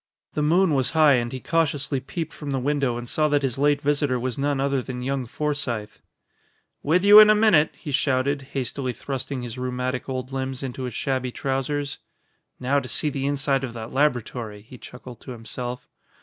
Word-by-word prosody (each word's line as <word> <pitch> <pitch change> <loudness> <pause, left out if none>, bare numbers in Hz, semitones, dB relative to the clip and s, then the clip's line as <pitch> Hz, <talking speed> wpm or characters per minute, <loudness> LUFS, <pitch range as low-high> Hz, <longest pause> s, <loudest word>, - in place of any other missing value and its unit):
The 150 - -1
moon 165 +3 +3
was 130 -3 +1
high 155 -2 +7
and 120 -2 0
he 130 - -5
cautiously 145 -4 0
peeped 160 +5 -5
from 145 - -7
the 135 - 0
window 135 -2 0
and 120 0 -6
saw 155 +5 +2
that 145 -1 +1
his 135 -1 -1
late 145 0 +3
visitor 140 -3 +1
was 125 -1 -2
none 140 0 0
other 135 -1 +1
than 125 0 -6
young 135 -1 -2
Forsythe. 120 -7 -3 0.8
"With 180 +6 +2
you 205 +1 +10
in 215 0 +9
a 215 - +6
minute!" 210 -8 +4
he 150 - -7
shouted, 140 0 +1
hastily 130 -1 -2
thrusting 135 0 -5
his 120 +1 -6
rheumatic 125 +1 -3
old 130 0 -4
limbs 130 0 -3
into 130 0 -4
his 125 - -6
shabby 130 -2 -1
trousers. 140 +2 -2 0.6
"Now 135 +3 +2
to 130 -2 -8
see 150 - 0
the 135 0 -2
inside 135 -1 0
of 125 -3 -4
that 110 -2 -7
laboratory," 120 -6 -1
he 125 +2 -13
chuckled 125 -1 -11
to 130 - -8
himself. 120 +2 -6
135 Hz, 190 wpm, -24 LUFS, 125-145 Hz, 0.8 s, you